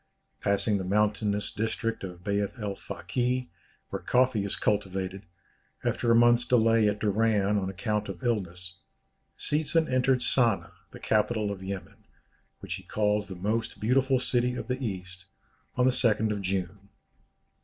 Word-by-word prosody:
Passing 100 Hz, +1 st, +1 dB
the -, -, -3 dB
mountainous 105 Hz, +1 st, 0 dB
district 110 Hz, 0 st, -2 dB
of 90 Hz, -2 st, -8 dB
Beith 100 Hz, +3 st, -1 dB
el 105 Hz, -2 st, -3 dB
Fakih, 125 Hz, +4 st, -3 dB, 0.4 s
where -, -, -4 dB
coffee 125 Hz, -4 st, +2 dB
is 100 Hz, -, -1 dB
cultivated, 95 Hz, -1 st, -2 dB, 0.6 s
after 120 Hz, -, 0 dB
a 115 Hz, -, +6 dB
month's 120 Hz, +1 st, +5 dB
delay 115 Hz, -2 st, +3 dB
at 105 Hz, -, -2 dB
Doran 105 Hz, -1 st, +1 dB
on 95 Hz, -1 st, -3 dB
account 105 Hz, +2 st, -2 dB
of 90 Hz, -3 st, -7 dB
illness, 90 Hz, -6 st, -3 dB, 0.6 s
Seetzen 155 Hz, +2 st, +1 dB
entered 130 Hz, 0 st, +2 dB
Sana, 115 Hz, -6 st, +4 dB, 0.2 s
the -, -, -12 dB
capital 110 Hz, -1 st, +1 dB
of 95 Hz, -2 st, -6 dB
Yemen, 95 Hz, 0 st, -7 dB, 0.6 s
which -, -, -5 dB
he -, -, -12 dB
calls 105 Hz, -1 st, 0 dB
the 95 Hz, -, -7 dB
most 110 Hz, +5 st, -2 dB
beautiful 130 Hz, +3 st, +2 dB
city 125 Hz, 0 st, 0 dB
of 115 Hz, -, -5 dB
the 130 Hz, +1 st, -3 dB
East, 90 Hz, -5 st, -6 dB, 0.5 s
on 125 Hz, -, +3 dB
the 130 Hz, -, +5 dB
2nd 110 Hz, -3 st, +2 dB
of 105 Hz, -1 st, -2 dB
June. 95 Hz, +1 st, -3 dB
105 Hz, 150 wpm, -28 LUFS, 100-120 Hz, 0.6 s, a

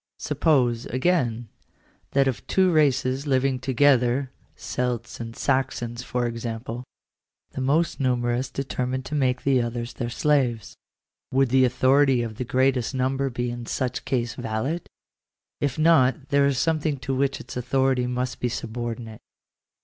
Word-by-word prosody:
Suppose, 135 Hz, -6 st, +1 dB
again, 125 Hz, -5 st, 0 dB, 0.7 s
that 135 Hz, 0 st, +4 dB
of 130 Hz, -, -3 dB
two 185 Hz, -1 st, +3 dB
races 140 Hz, -3 st, +2 dB
living 130 Hz, -1 st, +1 dB
together 130 Hz, 0 st, +2 dB
— -, -, -37 dB, 0.2 s
Celts 125 Hz, -2 st, -2 dB
and 115 Hz, -1 st, -6 dB
Saxons, 120 Hz, -2 st, -1 dB
for 125 Hz, 0 st, -2 dB
example 115 Hz, 0 st, -4 dB, 0.3 s
— -, -, -56 dB
the 130 Hz, -, -5 dB
most 155 Hz, +7 st, +1 dB
numerous 125 Hz, -1 st, 0 dB
determined 130 Hz, -1 st, -3 dB
to -, -, -7 dB
make 130 Hz, -4 st, +1 dB
the 135 Hz, -2 st, +3 dB
others 120 Hz, 0 st, -4 dB
their 120 Hz, -2 st, -4 dB
slaves. 125 Hz, -5 st, 0 dB, 0.6 s
Would 135 Hz, 0 st, +3 dB
the 130 Hz, +1 st, +5 dB
autho 130 Hz, +3 st, +4 dB
rity 130 Hz, -4 st, +2 dB
of 110 Hz, -2 st, -7 dB
the -, -, -2 dB
greatest 130 Hz, 0 st, +1 dB
number 135 Hz, +1 st, 0 dB
be 120 Hz, -1 st, -3 dB
in 120 Hz, -1 st, -7 dB
such 125 Hz, -1 st, -2 dB
case 120 Hz, -2 st, -1 dB
valid? 125 Hz, +9 st, -3 dB, 0.7 s
If 140 Hz, -3 st, -1 dB
not 150 Hz, -4 st, +3 dB
there 140 Hz, 0 st, +4 dB
is 140 Hz, -2 st, 0 dB
something 155 Hz, 0 st, 0 dB
to 135 Hz, +2 st, -2 dB
which 135 Hz, +1 st, 0 dB
its -, -, -9 dB
authority 130 Hz, 0 st, +1 dB
must 125 Hz, +1 st, -3 dB
be 125 Hz, -, 0 dB
subordinate. 115 Hz, -1 st, -5 dB
130 Hz, 150 wpm, -25 LUFS, 120-135 Hz, 0.7 s, the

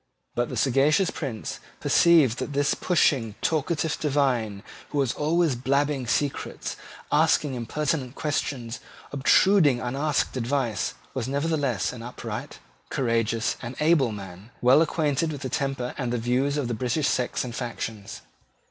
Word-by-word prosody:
But 120 Hz, 0 st, -1 dB
the -, -, -4 dB
sagacious 145 Hz, +7 st, +3 dB
Prince 125 Hz, -8 st, -5 dB, 0.2 s
perceived 155 Hz, -9 st, +4 dB
that 145 Hz, -, -4 dB
this 140 Hz, 0 st, +2 dB
pushing, 130 Hz, -, +1 dB
talkative 160 Hz, 0 st, 0 dB
divine, 125 Hz, -9 st, 0 dB, 0.3 s
who 145 Hz, -, -4 dB
was 135 Hz, -4 st, +1 dB
always 160 Hz, -1 st, +1 dB
blabbing 135 Hz, +1 st, 0 dB
secrets, 140 Hz, +3 st, -2 dB, 0.4 s
asking 145 Hz, -3 st, +3 dB
impertinent 130 Hz, +2 st, -2 dB
questions, 135 Hz, -6 st, -2 dB, 0.3 s
obtruding 145 Hz, 0 st, +4 dB
unasked 140 Hz, +6 st, -1 dB
advice, 125 Hz, -3 st, -1 dB, 0.2 s
was 130 Hz, -2 st, -3 dB
nevertheless 140 Hz, -, 0 dB
an 120 Hz, -, -8 dB
upright, 120 Hz, +1 st, -6 dB, 0.3 s
courageous 115 Hz, -2 st, 0 dB
and 125 Hz, +1 st, -6 dB
able 150 Hz, -6 st, +3 dB
man, 100 Hz, 0 st, -9 dB
well 130 Hz, +5 st, +6 dB
acquainted 155 Hz, -1 st, +1 dB
with 145 Hz, -3 st, -6 dB
the 130 Hz, -, -3 dB
temper 135 Hz, -1 st, -2 dB
and 125 Hz, -3 st, -1 dB
the 120 Hz, -, 0 dB
views 125 Hz, +5 st, 0 dB
of 120 Hz, -5 st, -1 dB
British 130 Hz, +4 st, 0 dB
sects 125 Hz, -1 st, 0 dB
and 125 Hz, -2 st, -6 dB
factions. 115 Hz, -4 st, -5 dB
135 Hz, 135 wpm, -26 LUFS, 120-150 Hz, 0.4 s, well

